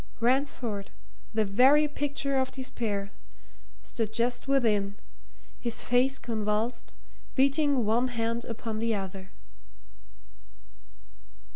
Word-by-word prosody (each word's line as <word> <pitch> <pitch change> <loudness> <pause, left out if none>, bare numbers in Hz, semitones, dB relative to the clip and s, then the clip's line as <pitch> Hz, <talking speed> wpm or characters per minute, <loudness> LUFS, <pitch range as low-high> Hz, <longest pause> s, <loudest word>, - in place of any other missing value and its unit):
Ransford, 240 -4 0 0.4
the 220 -1 +1
very 265 +9 +5
picture 285 -2 -1
of 260 - 0
despair, 215 -6 -3 0.7
stood 225 -2 -3
just 245 +3 0
within, 215 -7 +2 0.6
his 235 -2 -2
face 255 +3 +3
convulsed, 225 +1 -2 0.4
beating 275 -2 +3
one 235 +4 +2
hand 230 -1 -2
upon 225 -1 -4
the 230 0 +1
other. 190 -1 -6
235 Hz, 95 wpm, -28 LUFS, 215-265 Hz, 0.7 s, very